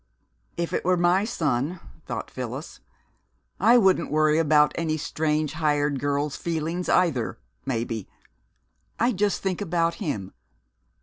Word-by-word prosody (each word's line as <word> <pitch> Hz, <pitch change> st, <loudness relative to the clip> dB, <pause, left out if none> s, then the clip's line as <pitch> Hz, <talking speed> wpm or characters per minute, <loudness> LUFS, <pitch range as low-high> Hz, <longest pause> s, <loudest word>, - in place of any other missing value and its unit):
"If 170 Hz, -1 st, -2 dB
it -, -, 0 dB
were 180 Hz, +1 st, +2 dB
my 175 Hz, +3 st, +3 dB
son," 160 Hz, -, -1 dB, 0.3 s
thought -, -, -5 dB
Phyllis, 130 Hz, +4 st, -6 dB, 0.8 s
"I 240 Hz, +2 st, +6 dB
wouldn't 190 Hz, -5 st, +3 dB
worry 155 Hz, +1 st, +3 dB
about 150 Hz, -2 st, +4 dB
any 160 Hz, -2 st, -1 dB
strange 155 Hz, 0 st, -1 dB
hired 145 Hz, -3 st, +1 dB
girl's 145 Hz, 0 st, -1 dB
feelings 165 Hz, +2 st, -3 dB
either, 160 Hz, -11 st, +2 dB, 0.3 s
maybe. 115 Hz, -4 st, -3 dB, 0.9 s
I'd 235 Hz, -2 st, +2 dB
just 205 Hz, +1 st, 0 dB
think 190 Hz, 0 st, -1 dB
about 170 Hz, -3 st, +1 dB
him.... 100 Hz, -, -3 dB
155 Hz, 125 wpm, -25 LUFS, 145-175 Hz, 0.9 s, I